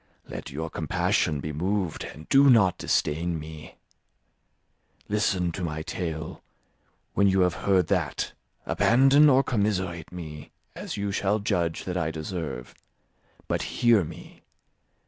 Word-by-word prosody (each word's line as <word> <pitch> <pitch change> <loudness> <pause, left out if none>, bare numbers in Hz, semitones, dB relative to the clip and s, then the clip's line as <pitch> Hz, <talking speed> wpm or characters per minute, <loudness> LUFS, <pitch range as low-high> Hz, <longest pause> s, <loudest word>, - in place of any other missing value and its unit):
Let - - -7
your 80 +3 -5
compassion 75 -3 0
be 75 +1 -4
moved, 90 +2 -2
and 75 +4 -10
do 140 +1 +6
not 95 -7 +5
disdain 80 +3 0
me. 75 0 -9 1.3
Listen 95 -4 +1
to 90 +3 -5
my 80 -2 -3
tale; 80 -2 -5 0.7
when 100 - +3
you 95 0 +3
have 90 -1 +3
heard 95 -1 +2
that, - - -1 0.3
abandon 135 +5 +5
or 135 0 +5
commiserate 95 - -1
me, 80 -4 -8 0.3
as - - -6
you 100 0 -2
shall 100 +1 +1
judge 90 -6 -1
that 90 -1 -3
I 85 -3 0
deserve. 80 -5 -5 0.7
But - - -1 0.2
hear 115 -5 +5
me. 75 - -11
90 Hz, 130 wpm, -26 LUFS, 80-100 Hz, 1.3 s, do